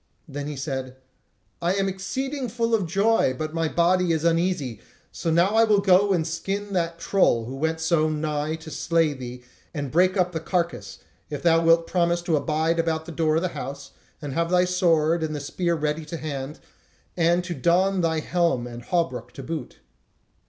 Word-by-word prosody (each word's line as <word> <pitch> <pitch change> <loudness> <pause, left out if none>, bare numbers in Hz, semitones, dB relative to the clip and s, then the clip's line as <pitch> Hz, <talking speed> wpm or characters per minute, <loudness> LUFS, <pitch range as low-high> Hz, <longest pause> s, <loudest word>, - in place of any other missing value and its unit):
Then 145 0 -5
he 150 - -5
said: 130 -2 -4 0.7
"I 175 +2 +1
am 195 0 +1
exceeding 260 +8 -3
full 230 +1 -1
of 200 -6 +2
joy, 195 -6 +2
but 155 +2 -4
my 165 -1 0
body 175 +1 +2
is 160 -1 -1
uneasy; 165 - 0 0.3
so 165 - -3
I 190 +7 +4
will 215 -2 +4
now 200 - 0
go 195 +1 +5
and 170 -4 +1
skin 195 +5 -3
that 170 -2 -1
troll 170 - +2
who 130 +3 -6
went 160 +3 -1
so 160 -1 +2
nigh 155 0 -2
to 160 0 -10
slay 160 +1 +1
thee, 125 -2 -8 0.3
and 145 -3 -3
break 185 +4 +3
up 180 -1 +2
the 165 - -3
carcase, 170 +1 -2 0.3
if 145 - -5
thou 165 -1 +4
wilt 165 0 +4
promise 170 -1 +1
to 170 -2 +1
abide 160 +3 0
about 160 -1 0
the 170 - -7
door 155 -1 +1
of 165 - +1
the 185 - 0
house, 140 -2 -7 0.3
and 145 -2 -4
have 170 +3 0
thy 180 0 +4
sword 170 -3 +2
and 155 -1 -2
the - - -3
spear 170 +4 -1
ready 155 0 -2
to 165 +2 -6
hand, 145 -1 -5 0.6
and 175 +1 +2
to 175 -1 -4
don 180 +5 +2
thine 160 -2 0
helm 170 -8 +1
and 120 0 -9
hauberk 165 -5 -1
to 135 - -8
boot." 155 -2 -6
165 Hz, 195 wpm, -24 LUFS, 150-180 Hz, 0.7 s, go